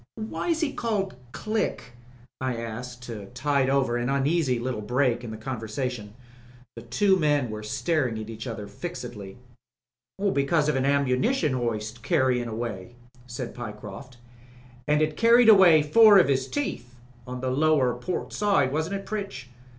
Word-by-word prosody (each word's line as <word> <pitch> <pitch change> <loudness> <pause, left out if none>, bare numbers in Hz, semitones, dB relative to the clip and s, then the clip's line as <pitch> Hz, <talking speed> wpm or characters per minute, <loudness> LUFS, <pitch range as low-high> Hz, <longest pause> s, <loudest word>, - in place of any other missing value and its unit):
"Why 220 +10 -4
was 330 -1 +1
he 295 -3 0
called 205 - -2 0.2
Click?" 215 - -3 0.5
I 130 -2 -1
asked 120 +2 -7
to 110 -5 -7
tide 140 +1 +1
over 135 -3 +1
an 120 +1 -2
uneasy 140 -1 +1
little 120 -2 -3
break 125 +2 0
in 120 - -6
the 110 - -6
conversation. 110 -2 -5 0.6
The 115 - -8
two 190 - +2
men 145 -7 +1
were 105 0 -6
staring 125 +3 -1
at 110 -1 -6
each 115 +2 -7
other 110 -3 -5
very 100 - -15
fixedly. 120 - -7 1.0
"Because 145 +2 +1
of 150 - +1
an 135 0 0
ammunition 140 - +1
hoist 115 -2 -3
carryin' 125 0 +1
away," 115 -1 -5 0.3
said 120 -1 -6
Pyecroft. 115 +2 -9 0.7
"And 150 +1 +3
it 155 0 -1
carried 235 0 +6
away 180 -7 +7
four 210 +7 +7
of 170 -7 +5
'is 130 -1 0
teeth 125 - -4 0.2
— 120 -1 -26
on 125 0 -6
the 130 -1 -1
lower 140 -2 +2
port 125 +9 -4
side, 195 -11 +2
wasn't 160 +6 -1
it, 195 - -6
Pritch? 195 -12 -5
130 Hz, 160 wpm, -26 LUFS, 120-155 Hz, 1.0 s, away